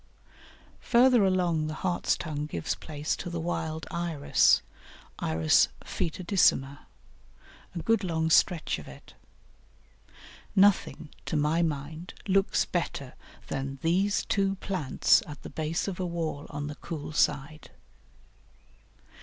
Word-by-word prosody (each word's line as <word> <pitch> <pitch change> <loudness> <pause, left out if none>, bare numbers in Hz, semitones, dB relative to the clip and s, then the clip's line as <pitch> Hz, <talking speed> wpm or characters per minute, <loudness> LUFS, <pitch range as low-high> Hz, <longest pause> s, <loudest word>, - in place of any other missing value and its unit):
Farther 245 -2 +4
along 175 -4 +1
the 155 - -4
Hartstongue 155 -4 -1
gives 85 - -2
place 150 -1 -3
to - - -6
the 170 -1 -4
wild 160 -1 -3
Iris 170 -4 +2 0.6
(I. 80 - -2
foetidissima), 140 - +2 1.0
a - - -2
good 225 -2 +2
long 160 -2 0
stretch 170 0 +3
of - - -11
it. - - -13 1.4
Nothing, 195 -5 +3 0.2
to 155 - 0
my 150 +3 +2
mind, 155 +2 -4
looks 195 0 +2
better - - -3 0.3
than 135 0 -4
these 190 +5 +1
two 195 -1 +1
plants 185 -8 +2
at 150 - -10
the - - -8
base 160 +3 -2
of 190 -2 -4
a 185 - -1
wall 165 -3 -4
on 145 -1 -5
the 150 - -5
cool 150 0 -7
side. 150 0 0
160 Hz, 120 wpm, -28 LUFS, 150-185 Hz, 1.4 s, Farther